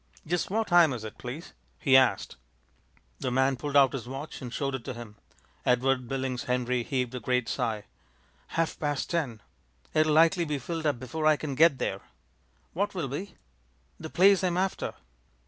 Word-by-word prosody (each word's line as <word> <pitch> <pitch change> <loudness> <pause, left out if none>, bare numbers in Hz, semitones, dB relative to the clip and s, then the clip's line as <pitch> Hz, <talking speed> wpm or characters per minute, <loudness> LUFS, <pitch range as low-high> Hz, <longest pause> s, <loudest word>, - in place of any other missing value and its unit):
"Just 175 +1 -1
what 220 +3 0
time 170 -5 +6
is 115 -3 -6
it, 110 - -8
please?" 130 +7 -7 0.2
he 135 -4 +3
asked. 130 -7 +3 0.8
The - - -2
man 130 +2 +2
pulled 145 +2 -1
out 135 -1 +6
a 125 -3 -5
watch 135 +4 -7
and 125 -2 -6
showed 135 +1 -2
it 130 -3 -4
to 125 - -5
him. 115 -3 -9 0.5
Edward 125 0 +2
Billings 130 0 -3
Henry 125 -1 0
heaved 125 0 -2
a 125 - -3
great 125 +1 0
sigh. 110 -5 -2 0.7
"Half 165 -1 0
past 145 -2 -2
ten! 135 -11 -2 0.5
It'll 155 0 +3
likely 165 +3 +5
be 150 -3 -2
filled 160 +3 -3
up 145 -5 0
before 155 +5 -2
I 155 -1 +5
can 145 -2 -4
get 155 0 +5
there." - - -2 0.7
"What 200 +3 -1
will 160 -7 -2
be?" 175 +7 -6 0.6
"The 160 - -7
place 195 +3 +5
I'm 180 -1 +1
after." 190 +1 -1
135 Hz, 180 wpm, -28 LUFS, 125-160 Hz, 0.8 s, time